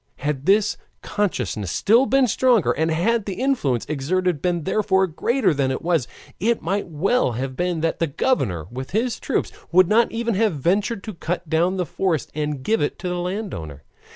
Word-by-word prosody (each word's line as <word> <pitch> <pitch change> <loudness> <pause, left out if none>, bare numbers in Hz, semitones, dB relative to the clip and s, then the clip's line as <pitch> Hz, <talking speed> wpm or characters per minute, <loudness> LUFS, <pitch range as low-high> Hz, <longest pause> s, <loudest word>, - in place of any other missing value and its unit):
Had 145 +1 -3
this 205 +2 +3 0.3
consciousness 125 - -2
been 235 +6 +5 0.2
still - - -1
stronger, 240 -2 +3
and 160 +1 0
had 200 +7 +1
the 195 - -3
influence 235 - 0
exerted 155 +3 -1
been 175 -2 0
therefore 190 0 +2
greater 190 - +1
than 135 -2 0
it 130 - -3
was, 165 -7 +1 0.3
it 230 +4 +1
might 195 +4 -1
well 170 - +1
have 130 +3 -4
been 175 -1 -1
that 165 0 -1
the 165 - +1
governor 130 - 0
with 130 +2 -6
his 240 +1 -1
troops - - -1 0.2
would 185 0 +6
not 225 +3 +3
even 230 0 -1
have 210 -3 +1
ventured 195 - 0
to 215 - -6
cut 175 0 -4
down 170 +5 +1
the 180 - 0
forest 165 -1 -1
and 150 -3 -3
give 225 +7 +1
it 145 - -1
to 185 - -5
the 180 0 -2
landowner. 175 - -5
180 Hz, 185 wpm, -22 LUFS, 150-210 Hz, 0.3 s, would